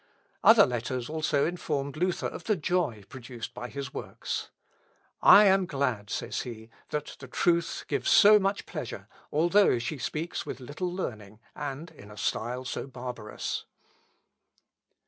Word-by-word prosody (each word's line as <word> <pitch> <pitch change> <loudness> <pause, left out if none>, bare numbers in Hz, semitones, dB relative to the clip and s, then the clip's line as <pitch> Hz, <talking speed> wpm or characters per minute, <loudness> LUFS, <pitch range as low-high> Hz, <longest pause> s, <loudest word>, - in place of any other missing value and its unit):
Other - - +8
letters 125 +2 -3
also 155 -2 +1
informed 150 -5 -2
Luther 180 +3 -1
of - - -5
the 215 -2 +2
joy 155 - -1
produced 120 -3 -8
by 125 0 -6
his 140 0 -6
works. - - -5 0.7
"I 210 - +9
am 190 -1 +4
glad," 125 -9 -1
says - - -3
he, 115 -2 -8 0.2
"that 150 -1 -4
the 140 - -9
truth 170 +5 0
gives - - -1
so 210 +1 +8
much 195 0 -1
pleasure, - - -6 0.2
although 175 +1 +4
she 130 +5 -4
speaks 155 +7 -3
with - - -6
little 145 +8 -4
learning, 110 - -5 0.2
and 150 +3 -5
in 105 -10 -14
a 105 - -12
style 120 +4 -2
so 125 - -4
barbarous." 125 -4 -5
140 Hz, 145 wpm, -28 LUFS, 120-170 Hz, 0.7 s, I